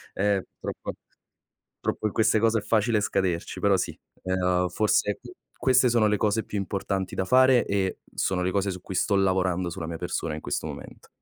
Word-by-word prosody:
Ehm, 100 Hz, -1 st, +1 dB, 0.2 s
purtroppo -, -, -5 dB, 0.9 s
purtroppo 110 Hz, -, -1 dB
in 105 Hz, -, -6 dB
queste 110 Hz, 0 st, +3 dB
cose 115 Hz, 0 st, +3 dB
è -, -, -7 dB
facile 110 Hz, 0 st, +2 dB
scaderci, 95 Hz, -4 st, -1 dB
però 100 Hz, -1 st, +3 dB
sì, 90 Hz, -4 st, -2 dB, 0.3 s
uhm, 90 Hz, -1 st, +1 dB
forse 105 Hz, +1 st, +1 dB
q -, -, -11 dB, 0.3 s
queste 130 Hz, -1 st, +4 dB
sono 115 Hz, -2 st, +3 dB
le 105 Hz, 0 st, +2 dB
cose 110 Hz, +1 st, +1 dB
più 105 Hz, -, -5 dB
importanti 95 Hz, -1 st, -2 dB
da 95 Hz, -, 0 dB
fare 130 Hz, +3 st, +5 dB
e 95 Hz, -2 st, -1 dB
sono 90 Hz, -1 st, 0 dB
le 90 Hz, -, 0 dB
cose 100 Hz, +1 st, 0 dB
su 90 Hz, -1 st, -5 dB
cui 95 Hz, -, -7 dB
sto 100 Hz, +3 st, +2 dB
lavorando 95 Hz, -2 st, +1 dB
sulla 85 Hz, -2 st, -5 dB
mia 85 Hz, -1 st, -5 dB
persona -, -, -3 dB
in 75 Hz, -, -6 dB
questo -, -, -3 dB
momento. -, -, -10 dB
100 Hz, 195 wpm, -26 LUFS, 90-105 Hz, 0.9 s, fare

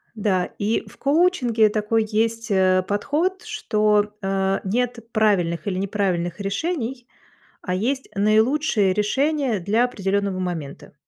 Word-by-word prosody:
да, 195 Hz, -4 st, +1 dB
и 210 Hz, +3 st, 0 dB
в -, -, -15 dB
коучинге 275 Hz, -8 st, +3 dB
такой 215 Hz, +1 st, 0 dB
есть, 225 Hz, +1 st, 0 dB
э, 185 Hz, -2 st, +3 dB
подход, 320 Hz, -, -1 dB
что, 215 Hz, -, +1 dB
э, 195 Hz, 0 st, 0 dB
нет 240 Hz, +4 st, -1 dB
правильных 190 Hz, -7 st, +1 dB
или 185 Hz, -2 st, -1 dB
неправильных 190 Hz, -3 st, -1 dB
решений, 245 Hz, -, -3 dB, 0.5 s
а 180 Hz, -, -3 dB
есть 255 Hz, +8 st, -1 dB
наилучшие 215 Hz, +1 st, +2 dB
решения 265 Hz, +3 st, 0 dB
для 210 Hz, +7 st, +1 dB
определённого 200 Hz, -4 st, -1 dB
момента. 165 Hz, -6 st, -5 dB
210 Hz, 120 wpm, -22 LUFS, 195-245 Hz, 0.5 s, коучинге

